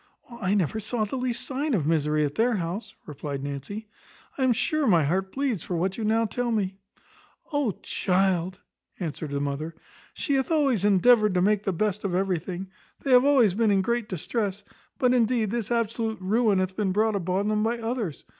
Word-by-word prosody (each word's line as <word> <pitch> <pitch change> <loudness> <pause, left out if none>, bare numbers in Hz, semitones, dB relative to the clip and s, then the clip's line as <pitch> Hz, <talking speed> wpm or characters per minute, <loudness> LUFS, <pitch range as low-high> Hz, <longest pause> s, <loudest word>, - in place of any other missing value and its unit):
"I 195 0 +1
never 200 +2 0
saw 220 +1 -1
the 210 - -5
least 250 -1 -2
sign 275 +1 -1
of 160 -8 0
misery 150 -1 +2
at 145 - -4
her 235 +1 +3
house," 180 +4 -4
replied 140 -2 -5
Nancy; 145 +10 -6 0.5
"I 270 - -1
am 260 - +4
sure 310 +5 +1
my 170 -7 +5
heart 190 +6 0
bleeds 265 - -1
for 180 - -4
what 185 +3 0
you 225 - -4
now 225 +1 +2
tell 245 +3 -2
me." 195 -4 -1 0.8
"O 285 -8 +1
child," 185 -1 0 0.4
answered 155 -3 -4
the 140 0 -2
mother, 145 +3 -3 0.4
"she 285 - -1
hath 265 +2 0
always 275 - +2
endeavoured 210 0 +4
to 180 - +3
make 210 +1 +2
the 195 - +1
best 210 +3 -1
of 190 -3 -1
everything. 185 0 -2 0.3
They 275 - -1
have 250 +1 +7
always 255 -9 +5
been 220 +2 +2
in 195 -2 +3
great 235 0 -1
distress; 200 +2 -2 0.3
but, 250 -3 +3
indeed, 230 -3 +2
this 230 -3 -2
absolute 230 -1 -1
ruin 210 +2 +2
hath 185 0 -1
been 200 -2 0
brought 215 +1 +2
upon 190 +2 -1
them 215 0 +1
by 230 +2 0
others. 225 - -3
205 Hz, 190 wpm, -26 LUFS, 185-235 Hz, 0.8 s, have